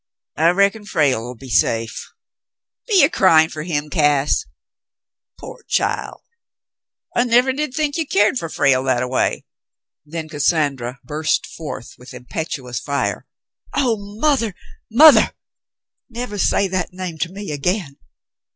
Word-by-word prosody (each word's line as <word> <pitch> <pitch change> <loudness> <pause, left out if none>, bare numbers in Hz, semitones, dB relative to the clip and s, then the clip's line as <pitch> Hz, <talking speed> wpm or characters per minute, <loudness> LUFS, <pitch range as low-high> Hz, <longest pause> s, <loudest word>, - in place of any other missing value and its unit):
I 165 +2 +3
reckon 200 +4 +2
Frale'll 135 - 0
be 130 +2 -11
safe. 115 +3 0 0.8
Be 405 -6 +5
ye - - +7
cryin' 160 - +4
fer 155 - -6
him, 150 -2 -3
Cass? 145 -3 +2 0.9
Pore - - -10
child! - - -1 0.9
I 240 - +3
nevah 245 +2 +3
did 290 -1 -3
think 300 -1 -1
you 325 -3 -2
keered 210 +4 +2
fer 165 - -5
Frale 135 -4 +2
that 125 -2 +1
a - - -2
way." 125 - -1 0.6
Then 160 +1 -6
Cassandra 140 -5 -1
burst 150 +4 -1
forth 150 -7 -8
with 125 - -12
impetuous 125 -2 -5
fire. 140 0 -2 0.5
"Oh, 250 -5 +2 0.2
mother, 255 -10 +1 0.3
mother! 295 +7 +7 0.8
Never 235 -3 -5
say 200 - +2
that 185 -1 -3
name 180 -3 -6
to 170 +3 -2
me 200 -2 -7
again. 150 0 -2
165 Hz, 135 wpm, -20 LUFS, 140-220 Hz, 0.9 s, ye